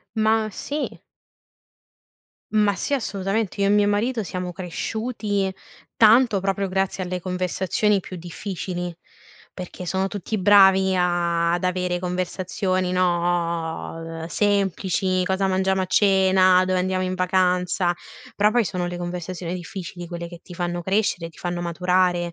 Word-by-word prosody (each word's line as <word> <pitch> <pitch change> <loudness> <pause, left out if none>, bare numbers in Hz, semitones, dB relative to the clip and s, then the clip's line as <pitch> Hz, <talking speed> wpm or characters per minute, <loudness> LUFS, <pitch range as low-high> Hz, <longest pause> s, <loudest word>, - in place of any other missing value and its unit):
Ma 220 0 +2
sì. 290 +9 -4 1.5
Ma 210 -2 +3
sì, 285 - -1
assolutamente, 200 -4 -2
io 200 - +3
e - - +3
mio 205 0 +4
marito 220 +3 0
siamo 180 -1 -4
cresciuti 205 +2 -2 0.4
tanto, 225 -1 +5
proprio 195 +1 -1
grazie 190 0 -1
alle 180 0 -4
conversazioni 185 +3 0
più 185 - -9
difficili, 175 +1 -5 0.6
perché 180 0 -8
sono 190 +2 0
tutti 205 +2 -4
bravi 190 -1 +5
a 170 -1 +1
ad 175 - -1
avere 180 -1 -1
conversazioni, 185 +1 -1
no, 170 -2 -1
ehm, - - -4
semplici, 190 -1 +1
cosa 190 +1 0
mangiamo 190 0 +1
a - - -2
cena, 190 -1 +4
dove 185 0 +1
andiamo 185 0 0
in 185 0 -2
vacanza, 180 -1 +1 0.4
però, 210 +1 +3
poi, 240 +1 +2
sono 180 -2 -2
le 175 - -5
conversazioni 175 0 -4
difficili 175 -1 -7
quelle 170 0 -5
che 170 0 -11
ti - - -13
fanno 175 0 -3
crescere, 190 -2 0
ti 165 - -19
fanno 175 -1 -3
maturare, 175 0 +1
185 Hz, 135 wpm, -23 LUFS, 175-195 Hz, 1.5 s, tanto